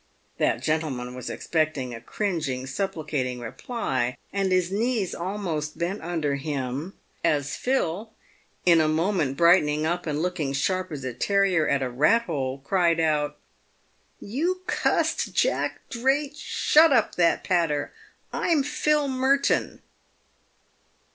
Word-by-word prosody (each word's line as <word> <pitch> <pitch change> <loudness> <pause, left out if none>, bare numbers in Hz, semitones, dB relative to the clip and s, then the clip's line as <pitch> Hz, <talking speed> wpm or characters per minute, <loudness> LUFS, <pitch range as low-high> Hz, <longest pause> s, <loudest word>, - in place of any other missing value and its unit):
That 120 +3 +1
gentleman 145 -6 -1
was 125 -1 -6
expecting 155 -6 -1
a 115 - -8
cringing, 155 - -2
supplicating 145 -5 -3
reply, 125 - -3 0.2
and 195 -1 0
his 185 -1 +2
knees 220 -2 0
almost 170 -5 -3
bent 175 +4 -2
under 160 -4 -1
him 140 +3 -4 0.3
as 145 -4 +1
Phil, 220 -5 -1 0.5
in 170 -2 +6
a 155 - +2
moment 160 -3 0
brightening 155 -3 +4
up 175 +1 -1
and 150 -1 -1
looking 165 -5 -1
sharp 185 +7 -1
as 145 -4 -6
a 130 -1 -3
terrier 190 - +2
at 140 -1 +1
a 130 - -2
rat 155 - +3
hole, 135 - -3
cried 170 -1 +2
out, 150 -2 +1 0.5
" - - -40 0.2
You 365 +4 0
cussed - - 0
Jack - - +1
Drake, 270 +4 +1
shut 310 +1 +4
up 235 -5 +3
that 170 -1 +2
patter; 165 -5 0 0.4
I'm 320 -5 +2
Phil 295 0 +1
Merton!" 265 +1 +1
165 Hz, 130 wpm, -25 LUFS, 145-200 Hz, 0.5 s, in